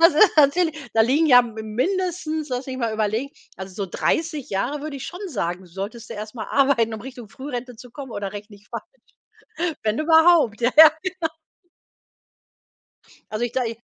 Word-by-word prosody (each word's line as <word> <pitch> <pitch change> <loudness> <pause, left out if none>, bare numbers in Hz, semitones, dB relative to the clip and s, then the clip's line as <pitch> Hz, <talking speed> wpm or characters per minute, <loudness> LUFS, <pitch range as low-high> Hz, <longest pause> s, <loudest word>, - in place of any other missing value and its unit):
Das 330 -1 +7
ist 355 +3 +5
natürlich 315 +2 +4 0.2
da 225 - +5
liegen 280 +8 +3
ja 250 -4 +8
m 235 -2 -6 0.2
mindestens, 330 - -1
lass 250 0 -3
mich 260 -1 -5
mal 230 -3 -1
überlegen, 220 +5 -1 0.3
also, 190 -1 -8
so 200 -1 -3
30 310 - -1
Jahre 210 +9 -2
würde 295 -1 -6
ich 265 - -7
schon 355 +2 -8
sagen, 180 - -3
solltest 200 +6 -7
du - - -5
erst 215 +2 -7
mal 230 - -5
arbeiten, 260 -5 +2
um 220 - -7
Richtung 245 -3 -10
Frührente 255 -2 -7
zu 245 +2 -13
kommen 265 0 -9
oder 200 -2 -4
rechne 205 0 -9
ich 205 +1 -23
falsch? - - -5 1.0
Wenn 215 +1 0
überhaupt. 320 -7 +4
Ja, 240 - +3
ja, 315 0 +11
genau. 365 -3 -3 2.0
Also, 215 +3 -2
ich 240 - -4
da 255 - 0
ich 225 -1 -5
250 Hz, 185 wpm, -23 LUFS, 220-310 Hz, 2.0 s, ja